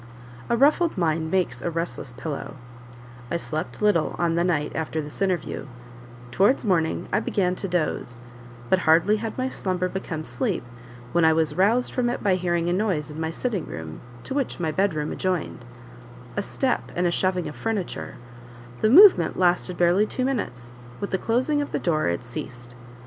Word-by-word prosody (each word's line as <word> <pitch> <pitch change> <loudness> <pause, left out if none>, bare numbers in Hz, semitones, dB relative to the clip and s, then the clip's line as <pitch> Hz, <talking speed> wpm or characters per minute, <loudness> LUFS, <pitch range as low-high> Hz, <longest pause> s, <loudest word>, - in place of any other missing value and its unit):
A 235 - +2
ruffled 305 - +3
mind 160 -2 0
makes 165 -9 0
a 175 - -1
restless 165 -5 -4
pillow; 150 +3 -5 0.7
I 170 - 0
slept 165 +4 -5
little 190 -7 +2
on 170 -1 +1
the 170 +1 +2
night 160 -5 0
after 160 0 -2
this 150 +3 -6
interview; 185 -6 -1 0.6
towards 205 - +3
morning 170 -5 +1
I - - +4
began 180 -3 0
to 195 - -3
doze, 155 -8 -2 0.5
but 190 - +3
hardly 170 +6 +4
had 225 +1 -5
my 255 0 0
slumber 185 -7 -2
become 180 -4 -4
sleep, 120 -4 -2 0.5
when 170 - +2
I 160 0 +6
was 160 -1 +2
roused 220 +7 +2
from 245 -2 +1
it 245 - -3
by 200 -3 +3
hearing 175 -2 0
a 175 - +1
noise 180 -7 -1
in 150 - -8
my 160 - -1
sitting 200 +1 -3
room, 80 -1 -7 0.2
to - - -5
which 275 -8 -2
my 160 -3 0
bed 190 +2 +1
room 150 0 -2
adjoined 180 -9 -2 0.7
a 205 - 0
step, 255 +5 -1
and 180 - +1
a 175 - +2
shoving 185 0 0
of - - -7
furniture; 215 -5 -3 0.6
the 215 - +3
movement 320 - +7
lasted 180 0 +1
barely 180 +4 +3
two 255 - -1
minutes; 125 - -3 0.3
with 200 - -4
the 190 - 0
closing 255 - +1
of 290 - -4
the - - +1
door 155 -3 +1
it 85 +6 -1
ceased. 120 0 -8
175 Hz, 180 wpm, -24 LUFS, 160-205 Hz, 0.7 s, movement